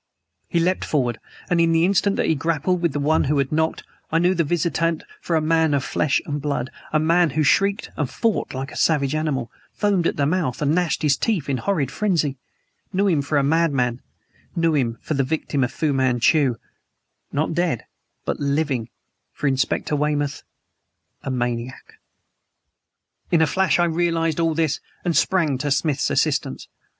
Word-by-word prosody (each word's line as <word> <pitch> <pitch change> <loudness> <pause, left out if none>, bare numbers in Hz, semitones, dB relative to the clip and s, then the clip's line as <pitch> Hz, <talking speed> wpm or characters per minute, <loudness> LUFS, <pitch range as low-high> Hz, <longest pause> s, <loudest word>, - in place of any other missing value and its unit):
He 170 - 0
leaped 180 +2 +1
forward; 125 -6 0 0.3
and 175 -2 +2
in 165 0 +3
the 165 +1 +4
instant 200 +1 +2
that - - 0
he - - +3
grappled 165 +4 0
with 170 -3 +1
the 145 - -3
one 150 +3 +2
who 145 +2 +1
had 140 -1 0
knocked 160 +1 0 0.3
I 165 - +2
knew 175 +2 +3
the 170 -2 +1
visitant 165 0 0 0.2
for 170 - -1
a 160 - +3
man 160 -1 +2
of 135 - 0
flesh 145 +1 +1
and 145 -1 -3
blood 140 -3 -2 0.2
a 155 - +3
man 170 +2 +3
who 155 - +3
shrieked 200 +7 +2
and 145 -5 -2
fought 225 - -1
like 135 +2 -4
a - - -10
savage 145 -3 +2
animal, 150 -6 -2 0.2
foamed 200 -5 +1
at - - -2
the 140 - +2
mouth 155 -5 0
and 150 0 +1
gnashed 175 -2 0
his 145 -2 +3
teeth 205 - -1
in 135 - +1
horrid 150 -6 -1
frenzy; 160 -10 0 0.5
knew 200 +1 +1
him 165 -7 +2
for 145 +1 -1
a 140 - +3
madman 140 -6 +1 0.5
knew 165 -1 +2
him 120 -6 0
for - - -3
the 135 -2 +1
victim 140 -1 -1
of 125 - -1
Fu 155 -3 0
Manchu 130 +1 +2 0.8
not 155 +3 -1
dead, 170 -8 -1 0.4
but - - -2
living 140 -5 -1 0.4
for - - -6
Inspector 135 +2 0
Weymouth 145 -1 -1 0.8
a - - -5
maniac! 120 0 -4 1.3
In 170 - +3
a - - +5
flash 190 +2 +2
I 175 - +3
realized 165 -1 0
all 165 -1 +1
this 160 -3 0 0.3
and 170 -2 +1
sprang 160 -4 +2
to 145 - -1
Smith's 140 0 +1
assistance. - - 0
155 Hz, 180 wpm, -22 LUFS, 140-170 Hz, 1.3 s, a